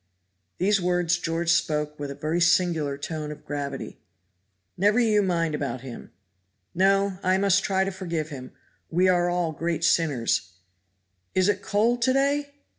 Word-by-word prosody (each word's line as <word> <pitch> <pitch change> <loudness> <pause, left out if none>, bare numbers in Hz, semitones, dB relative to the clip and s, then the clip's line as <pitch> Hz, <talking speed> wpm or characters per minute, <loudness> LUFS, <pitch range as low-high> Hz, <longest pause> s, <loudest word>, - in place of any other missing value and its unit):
These 195 +1 +2
words 175 -1 +1
George 165 0 -1
spoke 150 -2 0
with 145 -1 -4
a 140 - -6
very 155 +4 -2
singular 165 -4 +2
tone 150 +1 -5
of 150 - -11
gravity. 140 -2 -5 0.8
"Never 205 +5 +3
you 215 -3 +3
mind 170 -4 0
you - - -1
about 130 -4 -4
him." 130 -3 -9 0.6
"No! 195 +1 +2
I 185 +1 +2
must 195 -1 +3
try 190 -1 +1
to 195 - -2
forgive 170 -5 -4
him; 130 -4 -8 0.4
we 180 +3 +2
are 175 -1 +3
all 175 -2 0
great 165 +1 -3
sinners; 145 - +1 0.8
is 185 0 +3
it 200 -1 0
cold 225 +5 +1
to 255 +2 +3
day?" 285 +1 +1
175 Hz, 160 wpm, -25 LUFS, 150-195 Hz, 0.8 s, Never